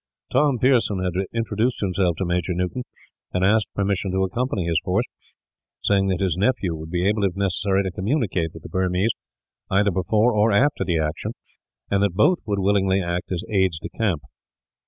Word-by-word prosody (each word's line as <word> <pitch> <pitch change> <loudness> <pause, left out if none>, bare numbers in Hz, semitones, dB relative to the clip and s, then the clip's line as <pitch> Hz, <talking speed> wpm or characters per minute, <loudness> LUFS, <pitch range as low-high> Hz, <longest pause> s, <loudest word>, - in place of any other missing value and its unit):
Tom 140 0 +3
Pearson 120 -5 +3
had 90 -2 -1 0.2
introduced 115 +1 -1
himself 90 -3 +1
to 95 - -2
Major 90 0 -1
Newton, 90 +8 -2 0.5
and 90 0 +2
asked 110 +2 +2
permission 100 -1 0
to 95 +1 +1
accompany 100 0 -1
his 85 -1 +1
force; 100 +7 +1 0.8
saying 100 -1 +2
that 95 -2 0
his 95 -4 +1
nephew 100 -2 +1
would 80 0 -8
be 90 +1 -1
able, 105 0 +1
if 95 -2 +1
necessary, 100 0 +1
to 95 - -3
communicate 95 - -1
with - - -12
the - - -9
Burmese 95 +3 +1 0.6
either 100 +1 +3
before 105 +6 +2
or 105 +1 +3
after 130 +8 +2
the 85 -3 0
action, 75 -1 -2 0.6
and 100 0 +2
that 100 -3 +1
both 165 - +4
would 100 -1 0
willingly 95 -1 +2
act 85 0 -3
as 90 -2 -2
aides 95 -5 +1
de - - -7
camp. 95 -10 -1
95 Hz, 180 wpm, -23 LUFS, 90-105 Hz, 0.8 s, both